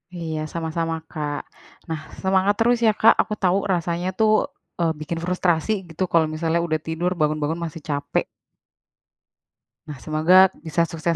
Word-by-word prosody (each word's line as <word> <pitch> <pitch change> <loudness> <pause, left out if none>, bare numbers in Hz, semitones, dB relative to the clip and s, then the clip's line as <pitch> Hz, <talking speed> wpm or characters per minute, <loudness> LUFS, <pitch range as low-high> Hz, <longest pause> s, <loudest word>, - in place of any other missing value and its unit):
Iya, 160 -2 -4
sama-sama 165 0 -2 0.2
Kak. 150 -2 -3 0.5
Nah, 160 -1 -2 0.2
semangat 190 +1 +3
terus 240 +2 +4
ya, 220 - +6
Kak, 220 - +8
aku 215 - -4
tahu 185 0 +4 0.2
rasanya 175 0 -1
tuh, 220 -1 +4 0.5
eee, 165 -1 +2
bikin 160 +2 -4
frustrasi 180 +1 +1 0.2
gitu, 165 +3 -3
kalau 165 -2 +4
misalnya 165 +1 0
udah 155 -1 0
tidur, 165 +3 -1
bangun-bangun 155 +1 0
masih 160 -1 -8
capek. 145 -1 -1 1.7
Nah, 145 - -6
semoga 155 +4 +4 0.3
bisa 165 +1 +1
sukses 165 +1 -1
165 Hz, 145 wpm, -23 LUFS, 155-180 Hz, 1.7 s, Kak